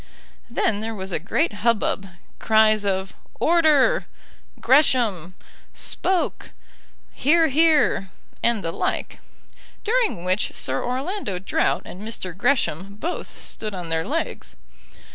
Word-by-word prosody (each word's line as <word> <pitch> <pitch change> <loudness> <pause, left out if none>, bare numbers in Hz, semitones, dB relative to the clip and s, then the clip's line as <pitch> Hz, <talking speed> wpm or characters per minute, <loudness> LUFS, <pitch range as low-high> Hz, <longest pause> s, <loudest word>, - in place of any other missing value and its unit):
Then 225 -3 0
there 225 0 -4
was 190 -1 -5
a - - 0
great 210 - 0
hubbub 210 -3 +1 0.3
cries 215 -1 +4
of 190 -1 -1 0.3
"Order," 330 - +4 0.5
"Gresham," 230 - +3 0.4
"Spoke," 370 -2 -1 0.6
"Hear, 325 +3 +3
hear," 300 - +3 0.3
and 235 -3 +1
the 165 - -2
like, - - -3 0.6
during 440 - 0
which 185 +3 0
Sir 130 +1 -1
Orlando 260 - -3
Drought 190 - 0
and 185 - -9
Mr. 210 -5 -5
Gresham 200 - 0
both 330 +12 -6
stood 215 -2 -5
on 175 -2 -6
their 160 0 0
legs. 325 +5 -3
220 Hz, 115 wpm, -23 LUFS, 190-300 Hz, 0.6 s, cries